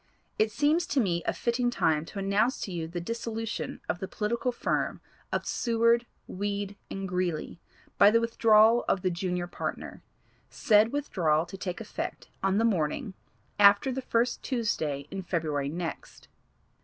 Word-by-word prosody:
It 215 0 +3
seems 300 +8 +2
to 285 - +1
me 175 -7 +1
a - - +3
fitting 240 +1 0
time 160 -9 +1
to 200 - -10
announce 200 +6 +1
to 195 - -4
you 165 -2 -3
the 175 +2 -5
dissolution 225 +3 -4
of 160 +2 -2
the 190 - -4
political 235 +5 -1
firm 240 - -1 0.3
of - - -1
Seward, 235 0 +2 0.2
Weed 200 +1 -3
and 195 0 -4
Greeley 180 -3 -2 0.4
by 200 - +9
the 230 +2 +4
withdrawal 230 0 +5
of 185 - +1
the 185 - +1
junior 180 0 -2
partner, 175 - -6 0.5
said 215 +1 +3
withdrawal 170 - +1
to 175 - -9
take 185 -2 -5
effect 225 - -6
on 195 +1 +1
the 225 - +3
morning 195 - 0 0.5
after 200 +6 +6
the 265 +1 -3
first 240 -1 0
Tuesday 155 - -2
in 195 - -4
February 155 -6 -1
next. 170 +2 -6
205 Hz, 155 wpm, -28 LUFS, 175-230 Hz, 0.5 s, by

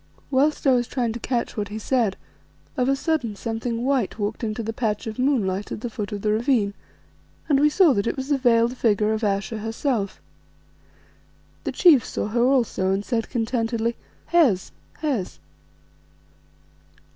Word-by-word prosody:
Whilst 285 +4 +2
I 270 - +6
was 245 -2 +2
trying 240 -4 -1
to 240 - -6
catch 240 0 -2
what 210 -2 -2
he 210 +2 -6
said, 220 -3 0 0.6
of 255 -2 +1
a 275 - +3
sudden 275 -7 -1
something 230 +2 -3
white 265 -7 0
walked 215 +3 -3
into 225 +1 -2
the 225 +1 -3
patch 220 -3 -2
of 220 +1 -6
moonlight 210 -8 0
at - - -5
the 240 - -4
foot 210 -3 -5
of 205 -1 -5
the 210 - +2
ravine, 220 -2 +1 0.7
and 280 -3 +3
we 300 +1 +5
saw 330 -2 +5
that 200 0 0
it - - -1
was 265 +1 -4
the 285 -2 +2
veiled 240 -1 +3
figure 215 -3 +2
of 220 +1 -3
Ayesha 205 +2 -1
herself. 225 -2 -2 1.5
The - - -1
chief 310 - +6
saw - - -3
her 235 +2 0
also 240 -7 +2
and 195 +1 -1
said 230 -3 -1
contentedly 230 0 -1 0.3
"Hes! 255 - +3 0.3
Hes!" 255 -12 -1
230 Hz, 170 wpm, -24 LUFS, 210-260 Hz, 1.5 s, I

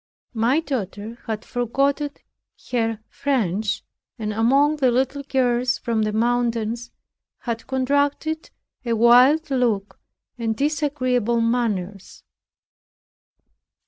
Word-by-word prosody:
My 240 +7 +2
daughter 230 - -5
had 220 -1 -4
forgotten 275 +4 0 0.6
her 225 -3 0
French, 220 -7 -1 0.3
and 215 -2 -3
among 275 +7 +3
the 265 -3 +3
little 265 +3 0
girls 250 -2 +1
from 230 -3 -1
the 215 0 0
mountains 235 0 0 0.5
had 230 -2 -4
contracted 285 +4 0 0.3
a 235 -2 -1
wild 250 +7 +5
look 230 -6 0 0.4
and 225 -1 -1
disagreeable 255 -6 0
manners. 215 -5 -2
240 Hz, 95 wpm, -23 LUFS, 225-275 Hz, 0.6 s, wild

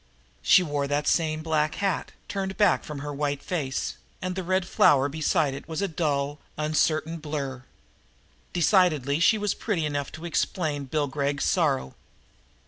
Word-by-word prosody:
She 185 - +6
wore 145 -3 -1
that 145 +1 -1
same 155 -2 +1
black 155 -1 +1
hat, 195 -3 -1 0.2
turned 195 -1 -3
back 205 - +4
from 150 -2 -6
her 145 - -4
white 145 0 -2
face, 140 -7 -2 0.2
and 185 0 -3
the 190 - -2
red 185 0 0
flower 140 -6 +4
beside 155 -1 +1
it 135 - -8
was 160 - -3
a 200 - +1
dull, 145 -4 -1 0.2
uncertain 155 +1 0
blur. 140 -4 -4 0.9
Decidedly 165 -6 +3
she 215 +6 +5
was 205 -1 0
pretty 180 -8 -1
enough 145 -2 -2
to 160 +2 -8
explain 155 -3 -1
Bill 145 +3 0
Gregg's 140 0 -1
sorrow. 65 0 +1
155 Hz, 155 wpm, -26 LUFS, 145-175 Hz, 0.9 s, She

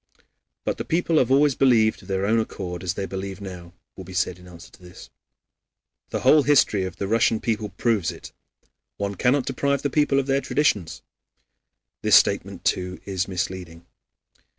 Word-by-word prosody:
"But - - -2
the - - -2
people 165 -1 +1
have 125 - +1
always 140 +1 +4
believed 115 -5 +3
of - - -16
their 95 0 -1
own 115 +3 +2
accord 90 -5 -5
as 90 -1 -2
they 100 - -3
believe 95 0 -6
now," 90 -3 -9 0.2
will 95 - -9
be 90 0 -10
said 90 -1 -1
in 90 - -15
answer 90 +1 -13
to - - -19
this. 90 0 -13 1.0
"The - - -3
whole 150 - +6
history 130 -9 +3
of 95 - -6
the 100 - -4
Russian 115 +1 +2
people 110 -2 -2
proves 100 0 0
it. - - -11 0.7
One 100 0 -3
cannot 125 +7 +1
deprive 140 -1 -1
the 145 - -1
people 145 -2 +2
of 135 - -1
their 135 0 +1
traditions." 105 - 0 1.0
This - - +4
statement, - - +2
too, 90 0 -1
is 95 -2 -2
misleading. 90 -3 -5
100 Hz, 175 wpm, -23 LUFS, 90-130 Hz, 1.0 s, whole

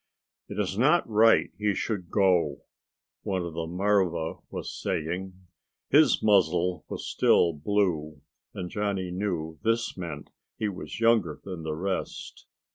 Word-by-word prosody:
"It - - -7
is 100 0 -1
not 150 +7 +4
right 115 +1 +4
he 105 -2 +1
should 95 -5 -3
go," 95 -4 +2 0.6
one 95 -2 -2
of 85 -2 -5
the 80 0 -3
marva 90 -3 0
was - - -6
saying. 90 +4 -3 0.6
His 145 -2 +5
muzzle 90 -4 +3
was - - -5
still 85 - +3
blue, 80 -3 -1 0.3
and 90 -3 -5
Johnny 100 -3 -2
knew 85 -4 -3
this 115 +1 0
meant 85 -3 -7 0.3
he 110 - -1
was 90 0 -7
younger 115 -9 +2
than 90 -4 -6
the 80 -1 -3
rest. 95 +4 -4
95 Hz, 135 wpm, -27 LUFS, 85-105 Hz, 0.6 s, His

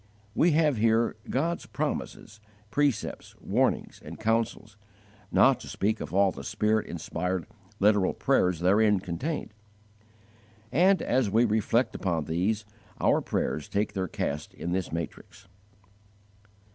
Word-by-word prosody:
We 165 +7 +3
have 150 -4 +3
here 115 +1 +2
God's 165 +6 -1
promises, 105 - -4 0.3
precepts, 145 -1 -1
warnings, - - 0
and - - -9
counsels, 110 -1 -1 0.6
not - - +5
to - - -10
speak 110 +2 -1
of 75 - -6
all 95 +1 +3
the 70 - -9
Spirit 105 - 0
inspired 90 +1 -3 0.3
literal 105 -2 +3
prayers 90 -2 +2
therein 105 +2 +4
contained; 105 - -4 1.2
and, 185 +8 +4
as 125 -4 +1
we 115 +4 +4
reflect 110 +3 +1
upon 85 -5 -1
these, 100 +7 -1 0.3
our - - +3
prayers 75 - -2
take 105 +1 -1
their 95 -2 -2
cast 75 -3 -4
in 85 - -4
this 95 0 -2
matrix. 85 +4 -7
105 Hz, 125 wpm, -28 LUFS, 90-115 Hz, 1.2 s, not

